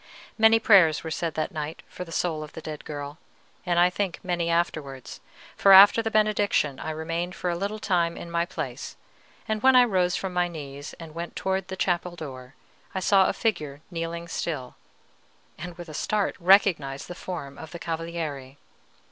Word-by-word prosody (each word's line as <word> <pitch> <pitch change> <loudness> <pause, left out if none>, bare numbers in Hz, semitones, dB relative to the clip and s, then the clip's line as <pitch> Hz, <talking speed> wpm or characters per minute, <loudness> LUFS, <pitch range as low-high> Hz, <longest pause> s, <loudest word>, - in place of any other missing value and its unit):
Many 220 0 +6
prayers 190 -9 +5
were 160 - -5
said 165 0 -2
that 155 - -2
night 155 0 -5
for - - -7
the 165 - -12
soul 165 -2 -1
of 155 0 -9
the 160 - -8
dead 155 -1 -7
girl, 145 +1 -6 0.5
and 175 -1 +1
I 175 +1 +5
think 195 -2 -2
many 175 -2 -1
afterwards; 155 -6 -2 0.4
for 195 - +6
after 200 +4 +9
the 225 - -2
benediction 210 -9 +1
I - - -5
remained 165 +3 -3
for 180 - -2
a - - -1
little 200 +4 -3
time 175 -5 0
in 170 - -8
my 170 0 +1
place, - - -6 0.5
and 215 -1 -1
when 265 +1 +6
I 250 - +8
rose 185 -6 +1
from 190 -2 -3
my 180 0 +2
knees 145 -4 -8
and 165 -2 -10
went 170 +1 -6
towards 190 -1 -1
the 190 0 -6
chapel 175 -1 -1
door, 130 -5 -9 0.4
I - - 0
saw 190 0 +4
a - - 0
figure 150 -10 -2
kneeling 170 0 -4
still, 155 -6 -4 0.8
and, 175 +1 -8
with 175 -1 -8
a 155 - -9
start, 210 +6 -1
recognized 170 -7 +3
the - - -6
form 160 -6 -7
of 160 - -9
the 170 - -8
Cavaliere. 160 -5 -5
170 Hz, 190 wpm, -26 LUFS, 155-190 Hz, 0.8 s, after